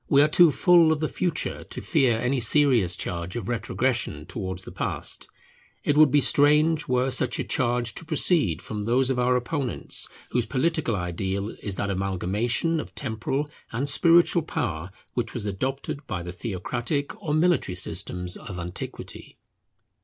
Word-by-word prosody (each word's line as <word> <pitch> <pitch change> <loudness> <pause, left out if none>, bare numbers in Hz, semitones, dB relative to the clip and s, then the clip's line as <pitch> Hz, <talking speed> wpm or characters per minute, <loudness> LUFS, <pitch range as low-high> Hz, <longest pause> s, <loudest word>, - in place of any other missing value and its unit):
We 140 0 +6
are - - +4
too 165 +1 +6
full 170 0 +5
of 155 - 0
the 155 - 0
future 170 -2 -2
to - - -7
fear 130 -8 +2
any 125 +3 0
serious 120 - +4
charge 85 +1 -4
of 120 - -4
retrogression 120 - -1
towards 95 0 -5
the - - -10
past. - - -4 0.6
It 145 - +1
would 155 -1 +7
be 145 - +4
strange 150 +2 +4
were 125 +1 +1
such - - 0
a - - -1
charge 120 -4 0
to - - -6
proceed 150 - +2
from 105 -1 -5
those 125 +5 +2
of 125 - -1
our 125 +1 +3
opponents 125 +1 -2 0.2
whose 120 -2 0
political 145 -3 0
ideal 95 +3 -3
is 100 -2 -3
that 100 +1 -1
amalgamation 100 - -1
of - - -8
temporal 130 +3 -2 0.2
and 125 +5 -2
spiritual 170 +3 +4
power 90 - -3 0.2
which 115 -3 -3
was 115 -4 -3
adopted 130 +8 -4
by 90 -6 -4
the 90 - -6
theocratic 120 - -3
or 150 -2 -1
military 160 - +2
systems 90 0 -1
of 95 - -8
antiquity. 85 0 -7
125 Hz, 160 wpm, -25 LUFS, 100-150 Hz, 0.6 s, would